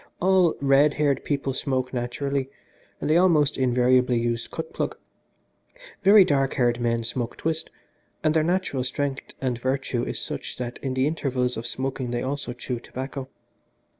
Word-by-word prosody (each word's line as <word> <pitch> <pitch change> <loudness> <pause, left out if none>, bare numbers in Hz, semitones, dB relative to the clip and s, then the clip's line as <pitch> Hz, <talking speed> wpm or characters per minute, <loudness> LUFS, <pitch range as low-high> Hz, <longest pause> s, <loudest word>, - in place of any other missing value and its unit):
All 185 -2 +4
red 140 +1 +4
haired 145 -2 +1
people 140 -2 -1
smoke 130 -1 -2
naturally, 135 +2 -2 0.5
and - - -3
they 155 +2 +4
almost 155 -5 +4
invariably 125 -1 +3
use 115 0 -1
cut 160 0 -6
plug. - - -2 1.0
Very 200 0 +8
dark 135 -5 +1
haired 120 -1 +2
men 115 -1 +1
smoke 120 +1 -3
twist, 160 0 -2 0.5
and 155 -1 +3
their 160 - +3
natural 170 -5 0
strength 135 +1 -3
and 125 -3 -1
virtue 130 -1 -1
is - - -3
such - - -5
that 125 -1 -5
in 130 -2 -2
the 130 +1 +2
intervals 130 -5 0
of 115 +1 -5
smoking 130 0 -3
they 120 0 -2
also 140 -1 -3
chew 125 0 -4
tobacco. 130 +2 -6
135 Hz, 160 wpm, -25 LUFS, 125-145 Hz, 1.0 s, Very